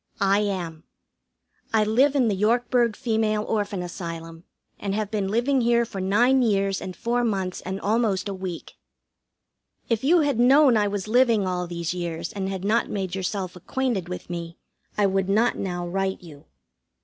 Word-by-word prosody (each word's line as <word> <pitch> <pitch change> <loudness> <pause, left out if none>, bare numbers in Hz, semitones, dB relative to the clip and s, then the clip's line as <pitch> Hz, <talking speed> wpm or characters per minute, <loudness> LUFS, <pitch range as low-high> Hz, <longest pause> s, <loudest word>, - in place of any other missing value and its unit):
I 200 0 +3
am. 180 -6 -3 0.9
I 220 -1 +3
live 255 +7 +3
in 255 -4 +3
the 205 - +1
Yorkburg 235 +2 +2
Female 220 -3 0
Orphan 205 -4 -2
Asylum, 165 -2 -7 0.3
and 200 -1 -2
have 215 -1 -2
been 205 -3 -1
living 245 +6 +1
here 235 0 +3
for 200 -4 -6
nine 240 +8 +3
years 195 -4 +1
and 185 -1 -6
four 240 +3 0
months 190 -5 -2
and 190 +2 -4
almost 210 -2 0
a 200 - -3
week. 185 -3 -6 1.2
If 230 0 0
you 335 +5 +5
had 285 -5 0
known 265 +1 +6
I 210 -1 +3
was 200 0 -3
living 230 -3 +3
all 180 -1 -2
these 170 0 -3
years 170 -2 -4
and 195 -1 -3
had 190 -1 -4
not 220 +3 +1
made 190 -3 -3
yourself 190 -1 -3
acquainted 205 -1 -2
with 180 - -6
me, 170 -1 -6 0.4
I 205 - +3
would 195 0 0
not 220 +5 +3
now 175 -2 -3
write 190 +1 -2
you. 150 -4 -13
200 Hz, 175 wpm, -24 LUFS, 185-235 Hz, 1.2 s, known